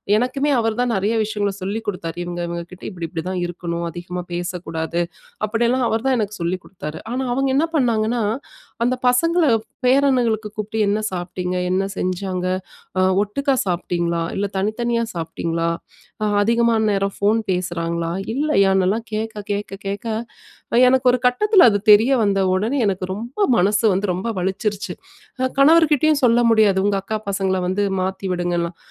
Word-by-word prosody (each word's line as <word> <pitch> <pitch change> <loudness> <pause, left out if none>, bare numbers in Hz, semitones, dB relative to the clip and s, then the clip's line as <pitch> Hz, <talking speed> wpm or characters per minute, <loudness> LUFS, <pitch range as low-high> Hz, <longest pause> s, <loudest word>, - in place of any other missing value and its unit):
எனக்குமே 255 +6 0
அவரு 225 -1 0
தான் 245 - +1
நெறைய 200 +4 0
விஷயங்கள்ல 205 -2 -1
சொல்லி 200 +4 -2
கொடுத்தாரு. 170 -4 -4
இவுங்க, 175 0 -5
இவுங்ககிட்ட 170 +1 -7
இப்பிடி, 170 -4 -5
இப்பிடிதான் 180 +2 -3
இருக்கணும். 170 -1 -4
அதிகமா 175 +1 -6
பேசக்கூடாது. 170 -1 -3 0.4
அப்பிடி 225 +3 0
எல்லாம் 255 0 +1
அவர்தான் 230 +4 +1
எனக்கு 210 -1 -2
சொல்லி 170 +2 0
கொடுத்தாரு. 160 -5 -7
ஆனா, 260 +2 -1
அவுங்க 270 +1 +1
என்ன 320 +4 +2
பண்ணாங்கன்னா, 235 -3 +1 0.6
அந்த 255 +1 +2
பசங்கல 330 +7 +3 0.4
பேரன்களுக்கு 250 -5 +2
கூப்டு 215 +1 -4
என்ன 205 +2 +1
சாப்பிட்டிங்க? 180 0 -3
என்ன 190 +1 +1
செஞ்சாங்க? 185 0 -2 0.5
அ - - +4 0.2
ஒட்டுக்கா 275 +6 0
சாப்பிட்டீங்களா? 170 -2 -1
இல்ல, 205 - 0
தனித்தனியா 230 +3 0
சாப்பிட்டீங்களா? 165 0 -2 0.5
அ - - +2 0.2
அதிகமான 230 0 +2
நேரம் 195 0 -1
ஃபோன் 210 +3 +2
பேசுறாங்களா? 170 -2 -2 0.2
இல்லயான்னுலாம் 200 -6 +2
கேட்க, 220 0 -3 0.2
கேட்க, 205 0 -3 0.2
கேட்க, 200 +3 -4 0.7
அ - - +4
எனக்கு 260 0 +2
ஒரு 250 - 0
கட்டத்துல 390 - +5
அது 205 - +1
தெரிய 220 +6 +6
வந்த 200 -2 +2
உடனே 215 +9 0
எனக்கு 190 -2 -1
ரொம்ப 235 - -7 0.2
மனசு 205 +5 +2
வந்து 195 +2 0
ரொம்ப 190 +6 -3
வலிச்சிருச்சு. 195 +3 -2 0.5
நான் 260 0 0
கணவர்கிட்டயும் 310 0 +5
சொல்ல 235 -1 +5
முடியாது. 210 -4 +4
உங்க 205 -1 +2
அக்கா 215 +3 -3
பசங்கல 190 -1 0
வந்து 195 +2 0 0.2
மாத்தி 190 +1 -3
விடுங்கன்லாம். 175 -1 -1
205 Hz, 145 wpm, -21 LUFS, 180-235 Hz, 0.7 s, தெரிய